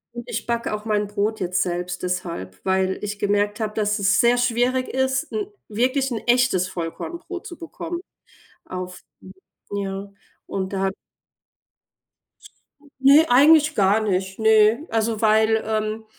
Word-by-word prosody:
Und 240 - -6
ich 230 +1 -4
backe 235 -2 -1
auch 210 0 -5
mein 210 -2 0
Brot 210 +2 -2
jetzt 180 0 0
selbst 180 0 -3
deshalb, 170 - -4
weil 190 0 +1
ich 205 0 -4
gemerkt 205 +1 0
habe, 215 -1 -2
dass 210 -1 0
es 195 +1 +3
sehr 240 +1 +4
schwierig 245 +1 +1
ist, 265 +4 -1
'n 420 -2 -2 0.2
wirklich 255 +5 0
'n 225 - -2
echtes 240 -7 +3
Vollkornbrot 335 - -6
zu 345 -4 -9
bekommen. 340 +1 -6 0.7
Auf 185 0 -7 0.7
ja, 195 0 -4 0.4
und 190 0 -4
da 195 0 0 2.1
Ne, 280 +4 +7
eigentlich 305 +4 +6
gar 200 0 +3
nicht, 190 -1 -2
ne. 220 +6 +4
Also, 225 0 -1
weil, 220 0 +3
ähm 215 0 -2
215 Hz, 135 wpm, -22 LUFS, 195-245 Hz, 2.1 s, Ne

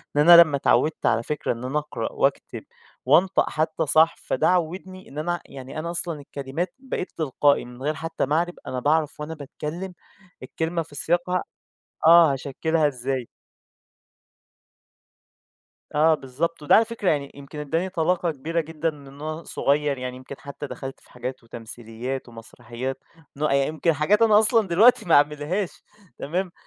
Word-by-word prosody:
لأن 150 +4 +4
أنا 170 0 +12
لمّا 150 -4 +3
اتعوّدت 155 +3 +1
على 115 - +2
فكرة 150 +2 -2
إن 120 +1 -5
أنا 135 +4 -2
أقرأ 150 0 -5
وأكتب - - -1 0.4
وأنطق 175 +8 +4
حتّى 160 +1 -1
صح، 160 +3 +4
فده 130 - 0
عوّدني 185 +2 -2
إن 145 - -12
أنا 175 +3 -2
يعني 135 +3 -8
أنا 170 +2 -4
أصلًا 170 -3 -3
الكلمات 140 +5 -5
بقيت 260 -8 -5
تلقائي، 145 -2 +2
من 125 +1 -12
غير 150 +3 0
حتّى 165 0 -3
ما 150 +3 0
أعرِب، 175 +1 0
أنا 130 - -3
باعرَف 150 +2 +1
وأنا 150 +2 -5
باتكلّم 160 +5 -6 0.5
الكلمة 165 +5 -2
في 150 -2 -11
سياقها 175 +4 0 0.6
آه، 165 -3 +7
هاشكّلها 150 +4 0
إزاي. 130 -2 -3 2.7
آه، 155 +2 +5
بالضبط، 150 +4 -3
وده 145 - +4
على 225 - +5
فكرة 225 -4 -1
يعني 140 -2 -1
يمكن 140 +2 -11
إدّاني 165 +5 -1
طلاقة 175 0 0
كبيرة 160 +4 -2
جدًا 160 +1 -2
من 140 -1 -14
وأنا 155 +2 -5
صغيّر، 145 -1 0
يعني 125 0 -5
يمكن 130 +2 -9
حتّى 140 +1 -8
دخَلت 135 -1 -8
في - - -23
حاجات 130 -1 -6
وتمثيليات 115 +3 -7
ومسرحيات، 120 +3 -7 0.4
نوأ 150 -1 0
يمكن 155 +4 +1
حاجات 185 +9 +2
أنا 215 -2 +6
أصلًا 220 -2 +3
دلوقتي 225 +8 +5
ما 165 - +4
أعملهاش، 150 +6 +1 0.4
تمام، 175 +4 -3
150 Hz, 155 wpm, -24 LUFS, 140-170 Hz, 2.7 s, أنا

